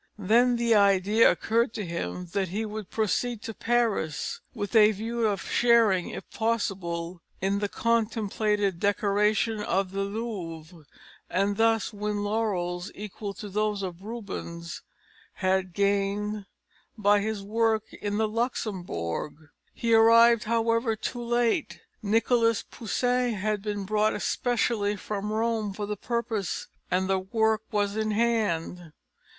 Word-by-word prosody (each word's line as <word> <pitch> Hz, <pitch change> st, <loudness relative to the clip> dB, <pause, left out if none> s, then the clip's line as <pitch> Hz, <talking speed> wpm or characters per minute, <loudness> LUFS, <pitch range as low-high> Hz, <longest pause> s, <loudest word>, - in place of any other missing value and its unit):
Then 235 Hz, +5 st, +3 dB
the 235 Hz, -1 st, +2 dB
idea 200 Hz, +1 st, +5 dB
occurred 230 Hz, +1 st, +1 dB
to 210 Hz, -, -3 dB
him 170 Hz, -, -4 dB
that 195 Hz, -2 st, 0 dB
he 205 Hz, +5 st, -3 dB
would 215 Hz, -2 st, -6 dB
proceed 225 Hz, +1 st, -1 dB
to 225 Hz, -, -5 dB
Paris, 230 Hz, -, 0 dB
with 210 Hz, -2 st, -5 dB
a 215 Hz, -1 st, +7 dB
view 225 Hz, +2 st, -1 dB
of 205 Hz, -2 st, -1 dB
sharing, 230 Hz, -6 st, +3 dB
if -, -, -7 dB
possible, 185 Hz, -6 st, -2 dB, 0.2 s
in 195 Hz, +1 st, 0 dB
the 205 Hz, 0 st, -1 dB
contemplated 215 Hz, -4 st, 0 dB
decoration 210 Hz, +2 st, +1 dB
of 195 Hz, -2 st, 0 dB
the 195 Hz, 0 st, -2 dB
Louvre, 180 Hz, -7 st, -5 dB, 0.4 s
and 200 Hz, +2 st, +1 dB
thus 225 Hz, 0 st, +2 dB
win 205 Hz, 0 st, -2 dB
laurels 195 Hz, -4 st, -1 dB
equal 205 Hz, 0 st, -6 dB
to 210 Hz, -, -7 dB
those 210 Hz, 0 st, -1 dB
Rubens 185 Hz, -3 st, -6 dB, 0.5 s
had 185 Hz, -1 st, 0 dB
gained 200 Hz, +2 st, 0 dB, 0.5 s
by 205 Hz, -1 st, +4 dB
his 210 Hz, -1 st, -3 dB
works 220 Hz, +1 st, 0 dB
in 205 Hz, 0 st, -1 dB
the 220 Hz, 0 st, +2 dB
Luxembourg. 180 Hz, -, -3 dB, 0.2 s
He 230 Hz, -1 st, 0 dB
arrived, 230 Hz, +1 st, +6 dB
however, 230 Hz, 0 st, +1 dB
too 240 Hz, +3 st, -4 dB
late: 240 Hz, +4 st, 0 dB, 0.2 s
Nicholas 230 Hz, +1 st, +2 dB
Poussin 245 Hz, +1 st, -1 dB
had 210 Hz, +1 st, -1 dB
been 205 Hz, -1 st, -3 dB
brought 215 Hz, +2 st, +1 dB
specially 225 Hz, -4 st, 0 dB
from 205 Hz, +1 st, -4 dB
Rome 220 Hz, -2 st, 0 dB
for 210 Hz, -, -3 dB
the 210 Hz, +1 st, -3 dB
purpose, 225 Hz, -2 st, -2 dB, 0.2 s
and 185 Hz, +1 st, +1 dB
the 190 Hz, 0 st, +2 dB
work 220 Hz, +3 st, +1 dB
was 205 Hz, -1 st, 0 dB
in 220 Hz, 0 st, 0 dB
hand. 205 Hz, -7 st, 0 dB
210 Hz, 130 wpm, -27 LUFS, 195-225 Hz, 0.5 s, a